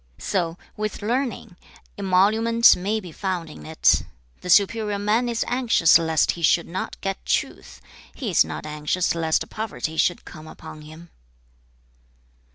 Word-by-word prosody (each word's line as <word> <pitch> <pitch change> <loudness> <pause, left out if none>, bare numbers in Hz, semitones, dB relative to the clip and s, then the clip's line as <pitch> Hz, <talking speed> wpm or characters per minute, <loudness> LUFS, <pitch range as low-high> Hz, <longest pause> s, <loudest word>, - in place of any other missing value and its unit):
So 175 -4 -2 0.2
with 215 -1 -5
learning; 230 -4 -3 0.4
emolument 215 +5 +4
may 205 +5 -2
be 180 -5 -10
found 175 -2 -4
in - - -12
it. 160 0 +3 0.4
The 180 - -8
superior 210 +2 +3
man 215 +4 0
is 230 -1 -1
anxious 235 -10 +4
lest 160 -1 +1
he 170 - -9
should 170 +1 +2
not 185 +3 -5
get 195 0 -4
truth; - - -3 0.4
he 240 -8 -4
is 170 - +5
not - - -7
anxious 150 +4 -1
lest 160 -1 0
poverty 205 -7 -5
should 175 - 0
come 155 -1 -12
upon 155 - -11
him.' 155 +3 -13
185 Hz, 145 wpm, -23 LUFS, 165-220 Hz, 0.4 s, is